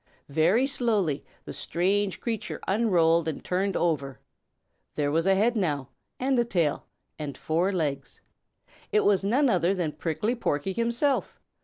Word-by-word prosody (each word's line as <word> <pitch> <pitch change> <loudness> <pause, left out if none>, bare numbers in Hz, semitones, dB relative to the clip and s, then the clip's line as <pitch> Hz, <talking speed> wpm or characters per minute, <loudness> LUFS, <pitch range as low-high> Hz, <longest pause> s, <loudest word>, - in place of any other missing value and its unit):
Very 170 - +3
slowly 215 - 0 0.2
the - - -7
strange 195 +2 0
creature 225 -3 -3
unrolled 170 -6 +3
and 160 - -4
turned 190 +2 0
over. 140 -6 -1 0.8
There 145 -1 0
was 165 +4 +1
a 195 - +5
head 225 +5 +2
now 145 - -1 0.3
and 260 0 +1
a - - +4
tail 170 -10 -1 0.3
and 145 -2 -5
four 170 +5 0
legs. 145 -6 -3 0.7
It 425 0 +3
was 195 -2 +3
none 255 +8 +3
other 185 -4 +2
than 170 -5 -1
Prickly 170 +10 -2
Porky 190 - -1
himself! 235 +6 0
185 Hz, 145 wpm, -27 LUFS, 160-225 Hz, 0.8 s, a